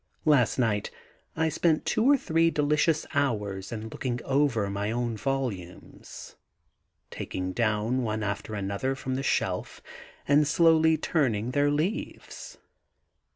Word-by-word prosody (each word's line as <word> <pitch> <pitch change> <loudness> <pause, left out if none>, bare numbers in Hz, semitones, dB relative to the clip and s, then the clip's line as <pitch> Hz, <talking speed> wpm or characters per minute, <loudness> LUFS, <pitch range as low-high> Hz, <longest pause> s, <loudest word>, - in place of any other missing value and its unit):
Last 145 -6 +3
night 110 -5 0 0.5
I 160 0 +2
spent 160 0 +1
two - - +1
or 285 - +6
three 165 -7 +2
delicious 150 +1 +1
hours 105 -9 -1
in 110 -1 -5
looking 125 +1 -3
over 135 -7 +1
my 100 +1 -2
own 120 0 -2
volumes, 105 -8 -5 0.8
taking 95 0 -4
down 110 +3 0
one 110 -2 -2
after 105 +1 -4
another 100 +7 -2
from 130 0 -4
the 130 - -1
shelf, 135 - -1 0.5
and 145 +1 +4
slowly 160 0 +4
turning 125 -8 0
their 145 +2 +2
leaves. 155 +10 -4
130 Hz, 125 wpm, -27 LUFS, 105-150 Hz, 0.8 s, or